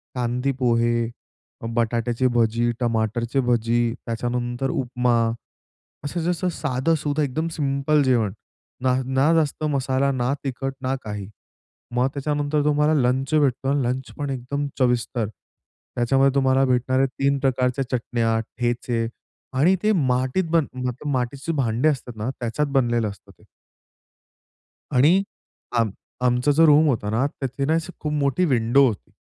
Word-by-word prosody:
कांदी 125 Hz, +2 st, 0 dB
पोहे, 120 Hz, -1 st, +2 dB, 0.6 s
अ, -, -, -6 dB
बटाट्याची 120 Hz, +1 st, +1 dB
भजी, 115 Hz, +1 st, +2 dB
टमाटरची 120 Hz, +2 st, 0 dB
भजी, 120 Hz, -1 st, +1 dB
त्याच्यानंतर 120 Hz, +2 st, -2 dB
उपमा 125 Hz, -2 st, 0 dB, 0.9 s
असं 170 Hz, +4 st, -3 dB
जसं 180 Hz, +1 st, 0 dB
साधंसुधं 150 Hz, 0 st, 0 dB
एकदम 155 Hz, +4 st, -1 dB
सिंपल 140 Hz, +1 st, +2 dB
जेवण. 115 Hz, -7 st, +2 dB, 0.5 s
ना 130 Hz, -1 st, +3 dB
ना 135 Hz, +4 st, +2 dB
जास्त 155 Hz, -1 st, 0 dB
मसाला, 135 Hz, 0 st, +1 dB
ना 125 Hz, +1 st, 0 dB
तिखट, 135 Hz, 0 st, -3 dB
ना 130 Hz, +1 st, 0 dB
काही. 105 Hz, -2 st, -5 dB, 0.7 s
मग 125 Hz, +2 st, +2 dB
त्याच्यानंतर 145 Hz, +1 st, 0 dB
तुम्हाला 150 Hz, +1 st, +3 dB
लंच 130 Hz, +4 st, 0 dB
भेटतो 135 Hz, -3 st, +2 dB
आणि 140 Hz, 0 st, +2 dB
लंच 125 Hz, +2 st, -2 dB
पण 145 Hz, -1 st, -2 dB
एकदम 135 Hz, +3 st, -3 dB
चविष्ट, 120 Hz, -3 st, +1 dB, 0.7 s
त्याच्यामध्ये 135 Hz, +3 st, +3 dB
तुम्हाला 135 Hz, 0 st, +3 dB
भेटणार 130 Hz, 0 st, +1 dB
आहे 135 Hz, -, +4 dB
3 140 Hz, +2 st, 0 dB
प्रकारच्या 130 Hz, 0 st, 0 dB
चटण्या, 115 Hz, -2 st, 0 dB, 0.2 s
ठेचे 120 Hz, -1 st, -1 dB, 0.5 s
आणि 180 Hz, +7 st, +4 dB
ते 215 Hz, -, +3 dB
मातीत, 130 Hz, 0 st, +1 dB
मतलब 130 Hz, -3 st, -1 dB
मातीचे 135 Hz, +5 st, -2 dB
भांडे 125 Hz, +2 st, +1 dB
असतात 125 Hz, -5 st, -3 dB
ना, 110 Hz, +4 st, -3 dB
त्याच्यात 120 Hz, +5 st, -1 dB
बनलेलं 120 Hz, -4 st, +2 dB
असतं 100 Hz, -, -14 dB
ते. -, -, -22 dB, 1.5 s
आणि 160 Hz, +10 st, +5 dB, 0.6 s
आम 115 Hz, -2 st, +2 dB, 0.3 s
आमचं 125 Hz, +3 st, +2 dB
जो 160 Hz, +3 st, +5 dB
रूम 150 Hz, +1 st, +6 dB
होता 110 Hz, -7 st, 0 dB
ना, 120 Hz, +6 st, +1 dB
तिथे 135 Hz, -1 st, -4 dB
ना, 155 Hz, +3 st, +2 dB
अशी 165 Hz, +2 st, -2 dB
खूप 150 Hz, -1 st, -2 dB
मोठी 145 Hz, +4 st, +1 dB
विंडो 130 Hz, 0 st, +4 dB
होती, 110 Hz, -5 st, -4 dB
130 Hz, 135 wpm, -23 LUFS, 120-145 Hz, 1.5 s, रूम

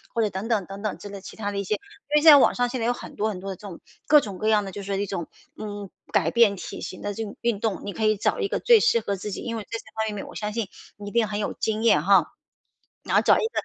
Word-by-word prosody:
或 230 Hz, -, +2 dB
者 210 Hz, -, 0 dB
等 190 Hz, +4 st, -4 dB
等 215 Hz, -5 st, +1 dB
等 195 Hz, +2 st, -9 dB
等 215 Hz, -2 st, -3 dB
之 205 Hz, -, -9 dB
类 200 Hz, -1 st, -8 dB
其 -, -, -10 dB
他 205 Hz, -2 st, -3 dB
的 200 Hz, -, -3 dB
一 -, -, -1 dB
些。 205 Hz, +2 st, 0 dB
因 400 Hz, -, -7 dB
为 -, -, -3 dB
现 320 Hz, -, +11 dB
在 290 Hz, -, +10 dB
网 -, -, +4 dB
上 245 Hz, 0 st, +1 dB
现 245 Hz, -1 st, -3 dB
在 230 Hz, -, 0 dB
有 245 Hz, -, +2 dB
很 -, -, -10 dB
多 215 Hz, +1 st, 0 dB
很 190 Hz, -, -5 dB
多 195 Hz, +1 st, -5 dB
的 190 Hz, -, -5 dB
这 205 Hz, -, -11 dB
种， 175 Hz, -, -9 dB, 0.3 s
各 300 Hz, -, +8 dB
种 200 Hz, -6 st, -6 dB
各 215 Hz, -, -1 dB
样 210 Hz, -2 st, +3 dB
的 195 Hz, -, -6 dB
就 200 Hz, -, -7 dB
是 195 Hz, -, -9 dB
说 195 Hz, -, -1 dB
一 205 Hz, -, 0 dB
种， 180 Hz, -4 st, -4 dB, 0.3 s
嗯， 205 Hz, -2 st, -6 dB, 0.2 s
改 170 Hz, -6 st, +2 dB
变 230 Hz, -4 st, +5 dB
体 -, -, -7 dB
型 185 Hz, -, -7 dB
的 205 Hz, -, -2 dB
这 225 Hz, +3 st, -4 dB
种 205 Hz, -, -8 dB
运 235 Hz, -4 st, 0 dB
动， 215 Hz, -3 st, -1 dB
你 200 Hz, -, -4 dB
可 220 Hz, -, -1 dB
以 215 Hz, -1 st, +3 dB
找 350 Hz, -, 0 dB
一 415 Hz, -, 0 dB
个 -, -, -2 dB
最 475 Hz, -3 st, +6 dB
适 230 Hz, -, +3 dB
合 200 Hz, -2 st, -2 dB
自 200 Hz, +2 st, -6 dB
己。 -, -, -5 dB
因 230 Hz, -1 st, -4 dB
为 215 Hz, -, -7 dB
这 230 Hz, -, -3 dB
些 -, -, -11 dB, 0.2 s
方 210 Hz, -, -4 dB
面 200 Hz, -, -5 dB
我 -, -, -11 dB
相 210 Hz, 0 st, -3 dB
信 225 Hz, -4 st, -2 dB, 0.3 s
你 205 Hz, 0 st, -8 dB
一 -, -, -12 dB
定 230 Hz, -2 st, +2 dB
很 205 Hz, 0 st, -3 dB
有 210 Hz, -, -2 dB
经 220 Hz, 0 st, -2 dB
验 230 Hz, -, +5 dB
哈。 -, -, +4 dB, 0.7 s
然 -, -, -1 dB
后 -, -, +6 dB
找 -, -, +5 dB
一 -, -, 0 dB
个 -, -, -15 dB
210 Hz, 360 characters per minute, -25 LUFS, 200-230 Hz, 0.7 s, 现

